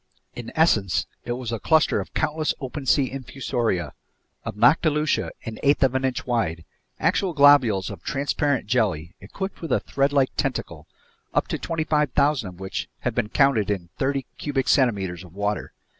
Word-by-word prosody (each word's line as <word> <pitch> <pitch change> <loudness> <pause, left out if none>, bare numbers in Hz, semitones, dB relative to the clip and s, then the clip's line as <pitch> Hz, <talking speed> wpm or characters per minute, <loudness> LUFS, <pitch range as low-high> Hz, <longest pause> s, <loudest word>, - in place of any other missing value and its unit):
In 120 -1 -7
essence, 110 - +2 0.2
it 120 - -2
was 120 -2 -5
a 115 - -2
cluster 160 +4 +3
of - - -7
countless 155 0 0
open 135 0 -6
sea 135 -2 +3
infusoria, 120 - -2 0.5
of - - -5
noctiluca 150 +6 +3 0.2
an 110 -2 -6
eighth 140 0 +3
of 130 -2 +3
an 130 0 0
inch 130 -2 -2
wide, 85 -10 -1 0.3
actual 190 -3 +1
globules 140 - +5
of - - -9
transparent 140 - -1
jelly 100 -8 0
equipped 190 - -6
with 165 - -5
a - - +3
threadlike 140 -1 +1
tentacle, 105 - -3 0.5
up - - +2
to - - -2
25,000 150 - +1
of 90 0 -14
which 95 0 -4
have - - -1
been 105 - -1
counted 135 -7 +3
in 95 -4 -2
thirty 135 -1 0
cubic 135 -3 -1
centimeters 95 - +1
of 90 -1 -15
water. 100 0 -2
130 Hz, 160 wpm, -24 LUFS, 100-145 Hz, 0.5 s, globules